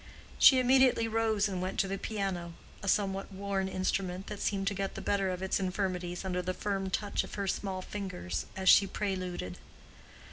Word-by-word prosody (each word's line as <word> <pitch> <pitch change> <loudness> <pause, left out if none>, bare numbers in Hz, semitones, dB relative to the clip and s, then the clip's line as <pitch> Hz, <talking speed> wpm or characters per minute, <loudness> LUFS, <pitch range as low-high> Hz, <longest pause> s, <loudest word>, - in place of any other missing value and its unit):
She 265 - +9
immediately 255 -2 +4
rose 220 -2 +1
and 185 -3 -3
went 185 +1 -3
to 195 - -2
the 195 0 -3
piano—a 195 -2 -5
somewhat 195 0 0
worn 195 0 -2
instrument 185 0 -2
that 210 - -6
seemed 195 -1 -1
to - - -4
get 195 0 -3
the - - -4
better 195 -1 0
of 185 0 -3
its 190 - 0
infirmities 185 -1 -2
under 180 -1 -1
the 185 +1 -3
firm 195 -2 -2
touch 205 +2 -1
of - - -8
her 200 -1 -2
small 190 -1 -2
fingers 180 - -4
as 190 0 -3
she 195 +1 +8
preluded. 185 - -3
195 Hz, 180 wpm, -31 LUFS, 185-200 Hz, -, She